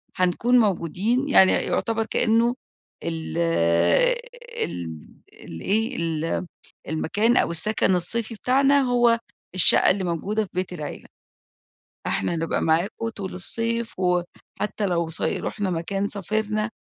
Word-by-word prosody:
هنكون 190 +7 +2
موجودين 210 - 0
يعني، 190 -8 +6
يُعتِبر 225 -1 0
كأنه 230 +2 +2 0.5
ال 165 0 -4 1.1
ال 85 - -6 0.3
ال 80 - -11
إيه، 225 +6 0
ال 165 +1 -2 0.4
المكان 210 +9 +1
أو - - +2
السكن 190 +3 +2
الصيفي 220 +6 -1
بتاعنا 275 +5 +3
هو 240 -2 +3 0.4
الشقة 185 - +7
اللي 190 0 0
موجودة 195 +6 -1
في 195 - -14
بيت 185 0 -3
العيلة. 155 -4 -7 1.0
إحنا 100 - -1
هنبقى 165 0 -2
معاكم 175 +8 0
طول 200 -4 -6
الصيف، 230 +5 -2
وحتى 180 +3 -2
لو 170 -2 -1
صي 165 - -2
رُحنا 205 -3 -3
مكان، 195 +4 -2
سافرنا، 215 +2 -2
200 Hz, 120 wpm, -23 LUFS, 170-230 Hz, 1.1 s, الشقة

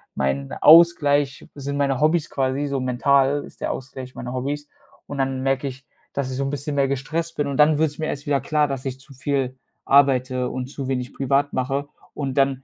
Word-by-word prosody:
mein 70 0 -1
Ausgleich 145 -4 +5
sind 140 0 -4
meine 140 -2 0
Hobbys 155 +1 +2
quasi 135 +1 -1
so 140 -2 -2
mental 135 +3 +2
ist - - -16
der - - -1
Ausgleich 130 -1 -7
meine 125 +1 -6
Hobbys. 145 +3 -3 0.4
Und 145 - -6
dann 135 -1 -1
merke 135 +1 0
ich, 130 0 -8 0.3
dass 140 -2 -2
ich 130 - -4
so 140 - 0
'n 135 - -1
bisschen 145 +1 -4
mehr 140 -1 +2
gestresst 160 +5 -3
bin 145 - 0
und 140 - -3
dann 150 0 +5
wird 160 0 +2
es 150 - -13
mir 155 - -1
erst 145 -1 -4
wieder 140 -2 +1
klar, 150 +2 +1
dass 135 -2 -4
ich 130 0 -4
zu 135 +1 -15
viel 130 -1 -2 0.3
arbeite 130 -2 +3
und 130 0 -4
zu 135 -1 -6
wenig 125 -2 -2
privat 140 +1 +1
mache 135 +2 -1 0.3
und 140 -3 -3
dann 135 -1 +2
135 Hz, 215 wpm, -23 LUFS, 130-145 Hz, 0.4 s, Ausgleich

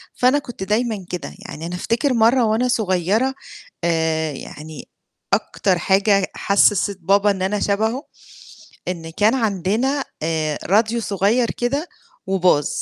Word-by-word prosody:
فأنا 255 +4 +3
كنت 245 -8 -8
دايمًا 210 -1 -1
كده، 180 - -5
يعني 160 +2 -8
أنا 175 +1 -4
أفتكر 235 +8 0
مرة 235 +2 +4
وأنا 225 +4 +1
صغيرة 215 +3 +1 0.5
آآ 160 -2 +1
يعني 150 +2 -9 0.4
أكتر 185 -2 +1
حاجة 195 +2 +2
حسّست 200 0 +2
بابا 200 +3 +3
إن 190 - -4
أنا 200 +2 0
شبهه، 220 +8 0 0.9
إن 165 -2 -4
كان 210 +8 +2
عندنا 225 - 0 0.2
آآ 155 -2 -1
راديو 220 +5 +2
صغير 210 +4 +1
كده 280 +8 -2 0.4
وباظ. 180 -6 +2
200 Hz, 125 wpm, -21 LUFS, 180-235 Hz, 0.9 s, مرة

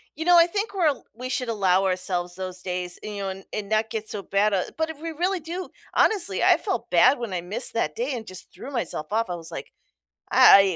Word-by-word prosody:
you 320 +2 -4
know, 355 -1 +7
I 335 0 +7
think 405 +3 -2
we're 355 -5 +2
al 280 - 0
we 255 +2 -6
should 250 -2 -2
allow 195 -3 +2
ourselves 180 -1 -1
those 185 -1 -5
days, 180 -1 -3
you 210 -1 -5
know, 195 -1 -3
and 190 0 -7
and 210 -1 -4
not 220 0 +1
get 220 -1 -4
so 200 -2 -4
bad 200 +1 +1
at 185 - -1
but 320 0 0
if 310 -1 -8
we 330 0 -4
really 360 +4 -1
do, 345 +4 -6 0.2
honestly, 410 -5 +2
I - - +6
felt - - -3
bad 255 0 +5
when 235 -5 -4
I 180 -2 -2
missed 180 +4 -3
that 155 -9 0
day 255 +4 -2
and 225 -2 -7
just 185 - -9
threw 280 - -9
myself 235 - -3
off, 225 -3 +1
I 175 - -2
was 165 -1 -7
like, - - -7 0.6
"I 195 -2 +7
215 Hz, 245 wpm, -25 LUFS, 185-300 Hz, 0.6 s, know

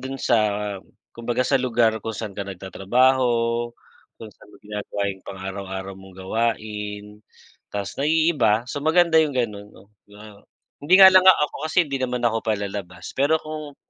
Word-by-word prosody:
dun 135 +1 -6
sa, 120 -2 +1 0.8
kumbaga, 120 +2 -2
sa 135 0 +2
lugar 115 -3 +1
kung 110 +1 -6
saan 105 -2 -6
ka 100 0 -6
nagtatrabaho, 120 +5 +1 0.5
kung 110 -1 -11
saan - - -20
mo - - -17
ginagawa 105 -1 -5
yung 95 - -17
pang-araw-araw 95 0 -6
mong 95 -1 -14
gawain, 105 0 -3 0.6
tas 100 -2 -5
naiiba. 145 -8 +2
So, 145 +3 -6
maganda 160 +1 +4
yung 150 -4 -1
ganon, 105 -4 -3
'no, 100 0 -20 0.2
'di 105 - -17
ba, 105 -1 -14 0.4
hindi 150 +6 +3
nga 190 - +11
lang 185 0 +6
nga 185 - +8
ako, - - -7
kasi 175 +2 +3
hindi 140 -3 -4
naman 125 -1 -2
ako 115 -1 +1
palalabas 100 -4 -5
pero 145 +4 +2
kung, 155 -2 -8
115 Hz, 165 wpm, -23 LUFS, 100-135 Hz, 0.8 s, nga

